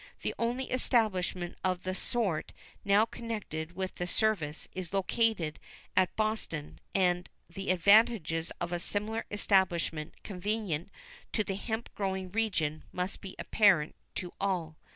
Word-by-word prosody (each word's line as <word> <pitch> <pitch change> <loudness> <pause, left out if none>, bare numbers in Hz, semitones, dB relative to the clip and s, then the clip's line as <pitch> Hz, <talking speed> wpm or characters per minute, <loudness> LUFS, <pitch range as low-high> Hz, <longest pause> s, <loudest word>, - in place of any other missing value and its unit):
The - - 0
only 245 +3 -1
establishment 190 -8 +1
of 185 -1 0
the 185 - -1
sort 195 -5 -1 0.3
now 200 +2 +5
connected 205 -9 -5
with 190 0 -2
the 175 - -2
service 175 -7 0
is 185 0 -4
located 195 -5 +1 0.4
at 185 -1 +3
Boston, 215 -9 -2 0.2
and 180 -2 +2 0.2
the 195 +3 -6
advantages 185 -3 +5
of 175 0 -2
a 175 - 0
similar 210 +5 -1
establishment 175 -6 +1
convenient 200 -3 -2 0.4
to 215 - +2
the 195 - -2
hemp 220 +4 -4
growing 190 -2 -2
region 180 -8 0
must 180 +2 -3
be 190 -2 -8
apparent 190 -8 +4 0.2
to 180 -1 -4
all. 180 -5 0
190 Hz, 130 wpm, -31 LUFS, 175-215 Hz, 0.4 s, now